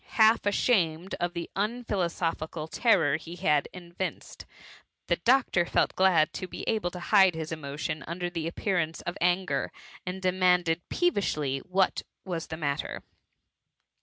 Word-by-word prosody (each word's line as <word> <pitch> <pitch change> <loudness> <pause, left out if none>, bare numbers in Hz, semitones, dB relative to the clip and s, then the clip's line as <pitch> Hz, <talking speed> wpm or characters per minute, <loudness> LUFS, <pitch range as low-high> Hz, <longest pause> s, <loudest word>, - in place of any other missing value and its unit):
Half 220 0 +6
asham 180 -6 +2
ed 190 - -5
of 175 0 -1
the 170 -1 -4
unphilosophic 190 -7 -2 0.2
terror 170 - +3
he 165 +2 -9
had 150 -4 +2
evinced, 175 -1 -6 0.6
the 170 - +1
doctor 240 -4 +3
felt 170 - +1
glad 180 -5 +4
to 185 - -5
be - - -7
able 215 -5 +1
to 180 - -8
hide 190 -1 +5
his 160 0 -5
emo 140 -3 -6
tion 155 0 -3
under 175 +1 -3
the 165 -2 -3
appearance 170 -2 -1
of 175 - -4
anger, 180 +2 +1 0.3
and 185 0 -4
de 185 -1 +1
manded 180 -2 +2
peevishly, 155 - 0
what 190 +4 +1 0.2
was 170 -4 -4
the 160 - -6
matter. 145 -3 -3
175 Hz, 150 wpm, -28 LUFS, 165-190 Hz, 0.6 s, Half